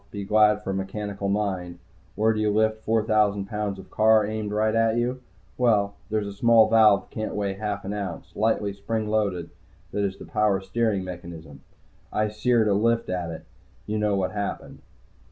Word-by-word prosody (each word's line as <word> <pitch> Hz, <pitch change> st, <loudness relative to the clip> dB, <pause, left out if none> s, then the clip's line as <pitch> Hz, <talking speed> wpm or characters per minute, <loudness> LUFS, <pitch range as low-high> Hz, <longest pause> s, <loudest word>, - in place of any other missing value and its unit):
Be 100 Hz, -1 st, -6 dB
glad 105 Hz, 0 st, +4 dB
for 95 Hz, -, -3 dB
a -, -, -2 dB
mechanical 100 Hz, +1 st, -4 dB
mind. 95 Hz, -4 st, -2 dB, 0.4 s
Where 110 Hz, +1 st, +2 dB
do 110 Hz, -, -3 dB
you 105 Hz, 0 st, +2 dB
lift 110 Hz, +1 st, +1 dB
four 110 Hz, 0 st, +1 dB
thousand 105 Hz, -2 st, +2 dB
pounds 105 Hz, -1 st, -3 dB
of 95 Hz, -, -13 dB
car 110 Hz, -1 st, +4 dB
aimed 110 Hz, 0 st, -3 dB
right 110 Hz, +1 st, +1 dB
at 115 Hz, 0 st, +2 dB
you? 125 Hz, +2 st, -1 dB, 0.4 s
Well, 105 Hz, -5 st, +3 dB, 0.2 s
there 110 Hz, 0 st, +1 dB
is 105 Hz, -, -4 dB
a 100 Hz, -, -6 dB
small 115 Hz, +1 st, +5 dB
valve, 110 Hz, -2 st, +4 dB
can't 110 Hz, -1 st, -4 dB
weigh 100 Hz, -1 st, -1 dB
half 105 Hz, 0 st, -4 dB
an 100 Hz, -, -3 dB
ounce, 100 Hz, -5 st, -6 dB
lightly 105 Hz, -2 st, 0 dB
spring 105 Hz, +2 st, -3 dB
loaded, 100 Hz, -6 st, -1 dB, 0.4 s
that 100 Hz, -, -1 dB
is 100 Hz, -1 st, 0 dB
in -, -, -9 dB
the -, -, -19 dB
power 105 Hz, -3 st, +2 dB
steering 105 Hz, 0 st, -1 dB
mechanism. 85 Hz, -6 st, -9 dB, 0.5 s
I 105 Hz, 0 st, 0 dB
seared 110 Hz, +1 st, +2 dB
a 100 Hz, -, +3 dB
lift 115 Hz, +3 st, +1 dB
at 90 Hz, -2 st, -2 dB
it. 80 Hz, -, -8 dB, 0.4 s
You 105 Hz, 0 st, -2 dB
know 105 Hz, -1 st, +1 dB
what 95 Hz, -1 st, -1 dB
happened. 100 Hz, -1 st, -5 dB
105 Hz, 195 wpm, -25 LUFS, 100-110 Hz, 0.5 s, small